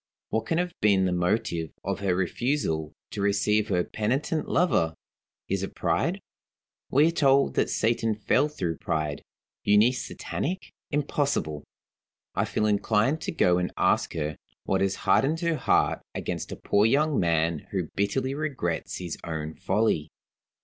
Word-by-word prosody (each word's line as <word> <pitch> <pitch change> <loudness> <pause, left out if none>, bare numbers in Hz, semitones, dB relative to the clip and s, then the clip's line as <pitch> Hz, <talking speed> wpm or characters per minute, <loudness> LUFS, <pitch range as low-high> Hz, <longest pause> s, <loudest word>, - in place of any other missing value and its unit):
What 110 0 -1
can 165 - +1
have 180 -1 -1
been 100 -3 +4
the 90 - +1
motive 90 -2 0
of - - -2
her 95 -3 +1
refusal 90 - -1 0.2
to 100 - -4
receive 100 +1 +2
her 90 -4 +1
penitent 135 - -1
lover? 85 - +2 0.5
Is 95 0 -1
it 95 - -5
pride? - - 0 0.7
We 150 +4 +5
are - - 0
told 140 -4 +3
that - - +1
Satan 115 -1 +1
fell 130 +7 +2
through 90 - -3
pride. 75 -2 -2 0.4
Euneece 110 +5 +3
satanic? 185 +5 -4 0.2
Impossible! 140 - -1 0.7
I - - +1
feel 105 - -1
inclined 110 +7 +2
to - - -3
go 90 - +3
and 90 - -1
ask - - +2
her 75 -1 -2 0.3
what 95 - 0
has 95 0 +1
hardened 155 +5 +3
her 170 -2 +1
heart - - +2
against - - -4
a - - -4
poor 105 +2 +2
young 150 +4 +2
man 80 -2 +1
who 90 -5 -2
bitterly 130 +7 0
regrets 140 - -2
his 90 -3 -5
own 80 -1 -4
folly. 80 -9 0
105 Hz, 150 wpm, -27 LUFS, 90-140 Hz, 0.7 s, We